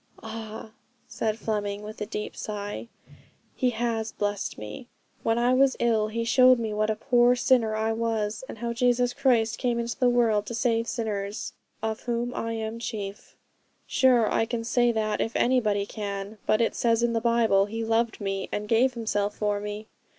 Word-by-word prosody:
'Ah!' 220 -1 -7 0.4
said 220 -1 -2
Fleming, 205 -2 -2
with 215 0 -9
a 210 - -2
deep 210 -1 -5
sigh, 205 - -5 0.7
'He 255 - +1
has 225 -1 -2
blessed 205 -1 -3
me. 105 - -8 0.3
When 225 0 +1
I 240 +1 +3
was 265 +1 +4
ill 225 -3 +2
He 230 +2 -2
showed 255 +2 +6
me 225 -2 -3
what 215 +1 0
a 220 - +1
poor 245 +1 +4
sinner 240 -3 +2
I 220 +1 0
was, 225 -1 -1
and - - -7
how 235 +1 -3
Jesus 245 0 +2
Christ 230 -5 +2
came 245 -2 0
into 235 +1 -3
the 250 -2 +4
world 225 -4 +2
to 235 - -4
save 230 -1 +1
sinners, 210 -4 -3 0.3
"of 220 0 -1
whom 240 0 -2
I 230 0 -3
am 225 0 -4
chief." 205 -4 -6 0.5
Sure 250 -4 +4
I 225 - +2
can 230 -1 -3
say 240 +1 +2
that 215 -2 -1
if 225 - -2
anybody 215 -5 +2
can. 200 0 -5
But 215 +1 +3
it 230 - +2
says 230 0 +2
in 235 -1 +2
the 230 - 0
Bible, 225 -4 +3
"He 225 +2 -3
loved 225 0 +1
me, 195 -2 -3
and 210 0 -3
gave 245 +3 +3
Himself 210 -3 -1
for 205 -1 0
me." 210 +1 -5
225 Hz, 185 wpm, -26 LUFS, 210-235 Hz, 0.7 s, showed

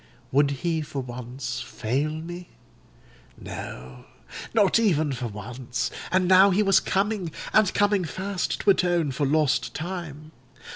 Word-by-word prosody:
"Would 140 +1 +4 0.2
he 165 -2 +1
for 145 -2 -5
once 125 +1 -5
fail 130 +7 -2
me? 170 +3 -7 0.9
No—not 65 - -3
even 160 -9 +2
for 125 -1 -3
once; 120 +4 -4 0.2
and 185 0 +2
now 190 +2 +7
he 200 +3 +3
was 195 -2 +5
coming—and 195 0 0
coming 205 -2 +2
fast—to 190 +3 0
atone 175 -5 +1
for 140 +2 -1
lost 150 -2 +1
time. 160 -3 -6
155 Hz, 115 wpm, -25 LUFS, 130-190 Hz, 0.9 s, now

